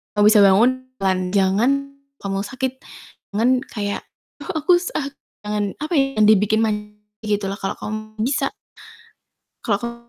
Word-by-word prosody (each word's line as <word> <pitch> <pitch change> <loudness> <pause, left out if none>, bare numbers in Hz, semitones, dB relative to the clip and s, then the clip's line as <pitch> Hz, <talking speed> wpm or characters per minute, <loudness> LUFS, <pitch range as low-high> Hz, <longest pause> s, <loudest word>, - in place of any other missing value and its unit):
kalo 205 - +3
bisa 215 - +6
bangun, 240 +7 +4 0.2
jalan, 190 -1 +2 0.2
jangan 200 +7 +3 0.5
ngomong 195 0 -2
sakit, 260 0 -4 0.6
jangan 230 +4 +3 0.2
kayak, 205 -2 -3 0.4
"Ah - - -5
aku 350 +1 +5
sakit," 280 -6 -4 0.3
jangan, 210 0 -1
apa 305 +3 -5
ya, 270 - +4 0.2
dibikin 215 +1 +4
manja, 210 -1 -2 0.3
gitu 205 -1 0
lah, 200 - -6
kalo 195 - -3
kamu 215 0 -6
bisa 265 +4 0 1.1
kalau 205 -4 +1
kamu 235 0 -4
215 Hz, 145 wpm, -21 LUFS, 205-255 Hz, 1.1 s, bisa